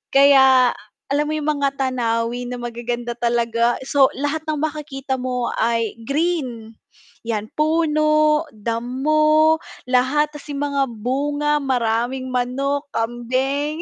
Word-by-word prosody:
Kaya 265 -2 +6 0.4
alam 295 +1 +1
mo 310 - -1
'yong 300 -1 -1
mga 275 -1 0
tanawin 245 -2 -1
na - - -7
magaganda 240 0 -4
talaga, 235 0 +1
so 275 0 +4
lahat 290 +3 -1
ng 305 -1 -1
makakita 280 -4 -3
mo 250 -1 -2
ay 230 -1 +1
green. 275 -8 -2 0.5
'Yan, 215 -2 -3
puno, 305 0 +2
damo, 305 +8 +2 0.3
lahat 270 +4 +2
ta's 295 -2 -12
yung 285 -1 -4
mga 280 -1 +1
bunga, 290 +6 -1
maraming 255 -1 -1
manok, 270 +3 -1
kambing. 260 +7 -1
270 Hz, 115 wpm, -21 LUFS, 240-295 Hz, 0.5 s, Kaya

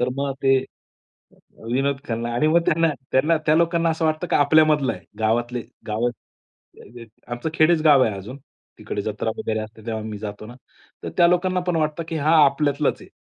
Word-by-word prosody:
तर 125 - +1
मग 140 0 -1
ते 135 0 +4 0.8
अ, - - -25 0.4
विनोद 135 +2 0
खन्ना 115 0 -2
आणि 150 +6 +1
मग 170 +2 +4
त्यांना 165 +1 +3 0.2
त्यांना 155 +5 +3
त्या 155 - +4
लोकांना 170 0 +2
असं 160 0 -2
वाटतं 155 +3 0
की - - +3
आपल्या 155 +2 +5
मधला 150 -3 +1
आहे. 90 -2 -11 0.2
गावातले 120 +2 0 0.3
गाव 110 +3 0
अ, - - +1 0.7
ते 115 +1 -13 0.2
आमचं 120 +6 -4
खेडेच 155 0 +3
गाव 145 -4 +6
आहे 110 - -1
अजून. 115 +8 -9 0.4
तिकडे 100 - -4
जत्रा 110 +1 -3
वगैरे 110 0 -2
असते 110 +1 -10
तेव्हा 110 -1 -3
मी 105 -2 -6
जातो 105 0 -7
ना. 120 - -11 0.5
तर - - -3
त्या 170 - +7
लोकांना 180 +1 +1
पण 170 - +1
वाटतं 155 +1 -1
की 165 - -3
हा 155 +2 +2
आपल्यातलाच 145 +1 0
आहे. - - -14
140 Hz, 200 wpm, -22 LUFS, 115-160 Hz, 0.8 s, त्या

